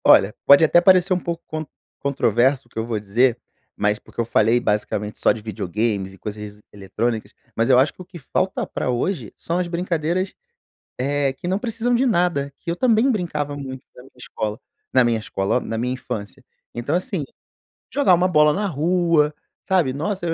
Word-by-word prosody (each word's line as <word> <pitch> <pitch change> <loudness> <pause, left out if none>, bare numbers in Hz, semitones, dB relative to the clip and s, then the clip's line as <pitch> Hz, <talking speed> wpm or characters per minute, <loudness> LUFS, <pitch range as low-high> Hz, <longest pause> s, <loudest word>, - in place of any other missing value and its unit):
Olha, 100 +2 +6
pode 140 +3 +8
até 175 +2 +5
parecer 185 +1 +5
um 180 - +1
pouco 170 -1 -5
con 155 0 -4 0.3
controverso 130 -1 +1
o - - -31
que - - -5
eu 110 - -2
vou 115 -3 -1
dizer, 115 +4 +2 0.4
mas 105 0 +1
porque - - -14
eu 115 - +1
falei, 115 +1 +3
basicamente, 105 -1 -2
só - - +4
de - - -3
videogames 105 -1 -2
e 95 - -15
coisas 105 +2 -7
es - - -21
eletrônicas, 110 +3 -3 0.2
mas 115 +3 +1
eu 130 - +6
acho 135 +3 +3
que - - -13
o - - -9
que 180 -1 -11
falta 185 +5 -1
pra - - -3
hoje 125 - -2
são 170 +2 -2
as 180 - -1
brincadeiras, 175 +1 -1 0.7
eh, 140 +1 0
que 135 - -8
não 190 +2 0
precisam 235 +1 -1
de 240 +2 +3
nada, 175 - +1
que 170 - -5
eu - - -2
também 235 +5 +3
brincava 150 - -2
muito 130 -2 -7
na - - -12
minha 130 - -18
escola. 110 -3 -5 0.3
Na 130 - +5
minha 115 -2 +1
escola, 100 0 -1
ó, - - +1
na 115 - -4
minha 125 +2 -1
infância. 105 -5 -6 0.3
Então, 120 +7 -2
assim, 185 - -2 0.7
jogar 275 -11 +5
uma 180 +2 +2
bola 150 -4 +5
na 205 +7 -1
rua, 165 -2 +2 0.3
sabe. 180 -9 +1
Nossa, 175 +6 -3
eu 165 - 0
140 Hz, 200 wpm, -22 LUFS, 115-175 Hz, 0.7 s, pode